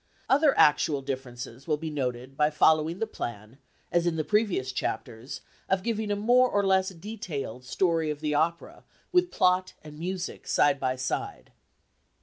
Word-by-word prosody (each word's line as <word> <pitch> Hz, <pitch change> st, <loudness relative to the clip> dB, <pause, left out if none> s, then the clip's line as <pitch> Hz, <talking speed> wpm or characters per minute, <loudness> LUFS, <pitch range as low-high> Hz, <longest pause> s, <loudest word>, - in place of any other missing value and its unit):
Other 285 Hz, +1 st, +4 dB
actual 145 Hz, -1 st, +4 dB
differences 130 Hz, -1 st, -6 dB
will 155 Hz, -2 st, +1 dB
be 160 Hz, +1 st, -5 dB
noted 130 Hz, -2 st, -3 dB
by 150 Hz, +1 st, +3 dB
following 155 Hz, +2 st, +3 dB
the 225 Hz, -, -1 dB
plan, 120 Hz, -, -7 dB, 0.3 s
as 175 Hz, 0 st, +2 dB
in 170 Hz, -, +1 dB
the 155 Hz, -, 0 dB
previous 200 Hz, -, +1 dB
chapters, 120 Hz, 0 st, -4 dB, 0.3 s
of 190 Hz, -1 st, +1 dB
giving 220 Hz, -2 st, -1 dB
a 205 Hz, -, +1 dB
more 245 Hz, +5 st, +4 dB
or 205 Hz, -2 st, +1 dB
less 190 Hz, -1 st, +3 dB
detailed 165 Hz, -, -6 dB
story 165 Hz, +2 st, +1 dB
of 150 Hz, -1 st, -3 dB
the 150 Hz, -1 st, -1 dB
opera, 165 Hz, +3 st, -1 dB, 0.3 s
with 360 Hz, 0 st, +3 dB
plot 185 Hz, -, +2 dB
and 150 Hz, -1 st, -11 dB
music 185 Hz, +2 st, -4 dB
side 145 Hz, -1 st, +3 dB
by 130 Hz, -1 st, 0 dB
side. 130 Hz, 0 st, -4 dB
160 Hz, 160 wpm, -27 LUFS, 135-190 Hz, 0.3 s, Other